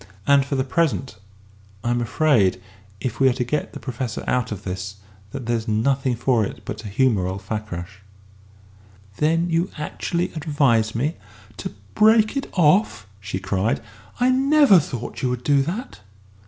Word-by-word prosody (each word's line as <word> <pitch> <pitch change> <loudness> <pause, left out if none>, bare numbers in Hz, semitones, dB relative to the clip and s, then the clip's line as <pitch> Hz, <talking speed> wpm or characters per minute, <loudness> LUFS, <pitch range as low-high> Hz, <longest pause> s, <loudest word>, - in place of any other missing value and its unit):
And 140 +1 +5
for 140 +1 -3
the 130 - +1
present, 135 -2 0 0.7
I'm 120 0 0
afraid, 115 -7 +2 0.4
if 115 +2 -4
we 135 0 +5
are - - +1
to 125 0 -1
get 150 +5 -2
the - - -7
Professor 125 -2 -4
out 125 -3 0
of 105 -1 -5
this, 95 +1 -5 0.4
that 125 - -6
there's 115 -1 -1
nothing 130 +4 +1
for 120 -1 +2
it - - -6
but 105 - -5
to 105 - -7
humour 105 -3 +2
old 95 +1 -5
Fakrash." 100 -3 -5 1.2
"Then 165 +3 +2
you 170 +3 +1
actually 170 +3 -2
advise 140 -9 +1
me 145 +8 -1 0.4
to - - -4
to - - -18 0.2
break 220 +1 +4
it 275 - -3
off?" 175 - +3
she 95 -1 -4
cried; 95 +3 0 0.4
"I 250 +1 +4
never 275 - +6
thought 125 -6 -5
you 130 - +1
would 125 0 -3
do 140 0 +3
that!" 185 - -4
130 Hz, 165 wpm, -22 LUFS, 110-155 Hz, 1.2 s, never